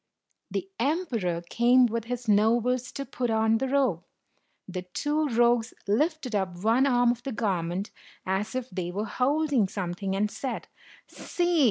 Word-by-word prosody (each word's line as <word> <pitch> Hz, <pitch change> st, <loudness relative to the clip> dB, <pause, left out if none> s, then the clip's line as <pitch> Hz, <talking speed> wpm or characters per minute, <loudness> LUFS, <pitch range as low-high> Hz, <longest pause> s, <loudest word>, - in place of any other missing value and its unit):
The 370 Hz, -, -3 dB
emperor 235 Hz, -, -1 dB
came 245 Hz, +4 st, +5 dB
with 230 Hz, -1 st, -2 dB
his 245 Hz, 0 st, -5 dB
nobles 235 Hz, +4 st, +2 dB
to 275 Hz, -, -4 dB
put 245 Hz, -2 st, -3 dB
on 220 Hz, 0 st, +2 dB
the 265 Hz, -, -1 dB
robe. 255 Hz, -11 st, +1 dB, 0.6 s
The 185 Hz, -1 st, -4 dB
two 295 Hz, +12 st, -1 dB
rogues 235 Hz, -1 st, +2 dB
lifted 285 Hz, -, 0 dB
up 190 Hz, -4 st, -1 dB
one 235 Hz, +5 st, +4 dB
arm 245 Hz, -2 st, +4 dB
of 240 Hz, 0 st, -5 dB
the 270 Hz, -, -4 dB
garment, 190 Hz, -4 st, -2 dB, 0.3 s
as 200 Hz, +5 st, -1 dB
if 255 Hz, -1 st, -2 dB
they 180 Hz, -1 st, -3 dB
were 200 Hz, +4 st, -3 dB
holding 275 Hz, -1 st, +1 dB
something, 190 Hz, 0 st, -3 dB
and 210 Hz, +1 st, 0 dB
said, 265 Hz, -, -5 dB, 0.4 s
"See! 350 Hz, -2 st, -1 dB
235 Hz, 155 wpm, -27 LUFS, 200-255 Hz, 0.6 s, came